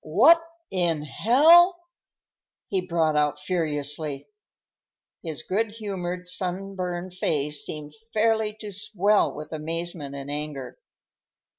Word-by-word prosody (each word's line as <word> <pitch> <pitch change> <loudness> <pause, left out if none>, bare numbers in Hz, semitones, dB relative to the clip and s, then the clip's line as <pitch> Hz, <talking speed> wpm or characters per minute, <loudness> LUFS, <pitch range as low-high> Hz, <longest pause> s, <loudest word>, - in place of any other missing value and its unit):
"What 270 - +5 0.3
in 170 -5 +1
hell—" 320 - +5 0.9
he 190 -2 -1
brought 160 -3 +1
out 150 -1 +1
furiously. 150 -4 -1 0.9
His 160 -4 -5
good 210 +2 -1
humored, 180 -4 -5
sunburned 180 -1 -3
face 150 -4 0
seemed 150 -1 -6 0.2
fairly 220 -1 +1
to 210 -1 -6
swell 205 +1 +2
with 150 +1 -9
amazement 160 -2 -5
and 140 +1 -6
anger. 145 -3 -5
175 Hz, 105 wpm, -25 LUFS, 150-205 Hz, 0.9 s, What